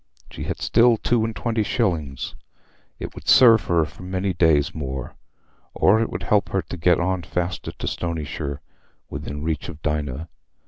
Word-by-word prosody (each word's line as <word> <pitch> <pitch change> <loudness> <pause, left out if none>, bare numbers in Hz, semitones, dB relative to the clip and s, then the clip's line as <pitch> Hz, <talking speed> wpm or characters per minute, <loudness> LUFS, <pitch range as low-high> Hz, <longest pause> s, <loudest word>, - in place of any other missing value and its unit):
She - - -6
had - - -3
still 120 0 +4
two 120 +1 +1
and 115 -1 -2
twenty 115 -2 -1
shillings; 85 - -1 0.6
it - - -7
would - - -11
serve 115 -4 +7
her 85 -2 +2
for 75 +3 -13
many 95 +1 -2
days 80 -4 +3
more, 65 -4 -5 0.6
or 110 +4 +4
it 115 - 0
would - - -5
help 105 -1 +2
her 95 -2 0
to 80 - -7
get 85 0 +3
on 95 +1 0
faster 85 +2 -3
to - - -6
Stonyshire, 75 -4 -3 0.5
within 75 +1 -5
reach 80 0 -2
of 80 -3 -8
Dinah. 75 0 -2
85 Hz, 170 wpm, -23 LUFS, 75-100 Hz, 0.6 s, serve